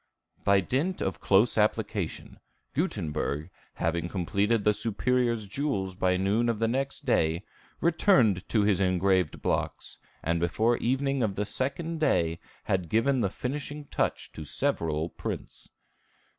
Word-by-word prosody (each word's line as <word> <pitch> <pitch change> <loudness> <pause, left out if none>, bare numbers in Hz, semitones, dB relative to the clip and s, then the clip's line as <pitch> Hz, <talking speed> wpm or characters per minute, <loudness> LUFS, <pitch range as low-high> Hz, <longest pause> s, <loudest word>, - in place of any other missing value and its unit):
By 100 -1 +4
dint 150 - -1
of 95 -3 -2
close 105 +4 +4
application, 105 -4 -1 0.3
Gutenberg, 80 - -2 0.2
having 85 +1 -1
completed 100 +4 0
the 105 - +4
Superior's 115 +1 +1
jewels 100 -5 -2
by 90 0 +1
noon 105 +5 +1
of 115 - 0
the 115 +1 +1
next 135 +4 -2
day, 80 +3 +2 0.4
returned 130 - +3
to 110 -3 +3
his 100 -2 +2
engraved 95 -2 +1
blocks, - - -2 0.2
and 85 0 +1
before 110 +8 +2
evening 135 +2 0
of 105 -4 0
the 105 - -1
second 150 +9 -2
day 85 - +1 0.2
had 90 -3 -1
given 130 +4 +2
the 100 - +1
finishing 145 +6 -5
touch - - -1
to 80 - -8
several 80 +2 0
prints. - - -6
105 Hz, 135 wpm, -28 LUFS, 90-125 Hz, 0.4 s, By